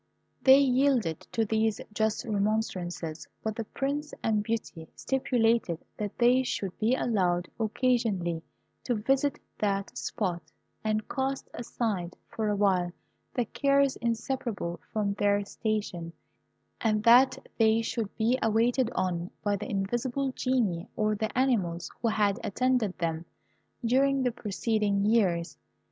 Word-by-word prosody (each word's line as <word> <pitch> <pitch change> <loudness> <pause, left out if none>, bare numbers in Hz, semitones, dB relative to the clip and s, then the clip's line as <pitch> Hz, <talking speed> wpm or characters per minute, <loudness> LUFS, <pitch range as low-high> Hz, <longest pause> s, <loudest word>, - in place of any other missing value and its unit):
They 265 0 +8
yielded 255 - +2
to 225 - +1
these 220 0 +1
just 220 +3 0
remonstrances, 200 -6 -2 0.2
but 220 -1 -2
the 230 - -4
Prince 285 +6 -3
and 215 -2 +2
Beauty 205 -7 -4
stipulated 235 -8 +1 0.2
that 205 -2 -5
they 245 +2 +5
should 195 -7 -3
be 225 +4 +3
allowed 180 -8 +1
occasionally 215 -7 0 0.4
to 245 - 0
visit 270 +6 +1 0.2
that 200 -1 -1
spot, 180 -5 -2 0.4
and 215 0 0
cast 270 0 -2
aside 210 -7 -3
for 220 -1 -2
a 205 - +1
while 185 -3 +2 0.4
the 245 - +1
cares 275 +3 +2
inseparable 230 -6 -2
from 205 -2 0
their 205 0 +1
station, 205 -6 -3 0.7
and 215 -2 +1
that 245 +3 +6 0.2
they 225 0 +4
should 225 -2 -2
be 235 +3 +2
waited 230 +3 +2
on 180 -1 -1
by 205 -1 +1
the 210 +5 -5
invisible 240 +6 -1
Genii 235 -11 0
or 215 0 +1
the 220 +2 -3
animals 195 -10 +1
who 235 - +1
had 210 -1 +2
attended 250 -2 +1
them 165 -1 -2 0.6
during 270 +3 +3
the 250 - +2
preceding 210 -2 0
years. 190 -6 +1
220 Hz, 130 wpm, -29 LUFS, 195-245 Hz, 0.7 s, They